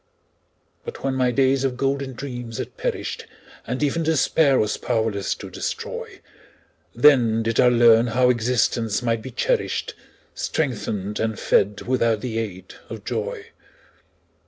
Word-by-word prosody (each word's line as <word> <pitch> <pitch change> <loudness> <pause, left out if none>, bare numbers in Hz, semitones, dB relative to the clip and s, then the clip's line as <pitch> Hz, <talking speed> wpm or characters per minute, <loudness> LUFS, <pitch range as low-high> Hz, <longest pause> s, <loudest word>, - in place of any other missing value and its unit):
But - - -8
when 135 - 0
my 130 -1 +2
days 135 +2 +2
of 130 -2 -1
golden 135 0 -1
dreams 120 -3 -6
had - - -6
perished, - - -4 0.4
And 125 +4 -2
even 150 +3 0
Despair 155 -3 +3
was 105 -2 +1
powerless 110 -4 -1
to - - -10
destroy, - - -5 0.7
Then 120 -4 +5
did 115 0 -1
I 125 - +6
learn 120 -1 +5
how 125 +2 +3
existence 115 -2 0
might 115 -2 0
be 130 - -7
cherished, - - -1 0.4
Strengthened 105 -8 -2
and 110 -1 -1
fed 100 +1 +2
without 115 -4 +1
the 115 -3 -3
aid 95 -4 -6 0.2
of - - -8
joy. 460 -2 -4
120 Hz, 135 wpm, -23 LUFS, 110-135 Hz, 0.7 s, I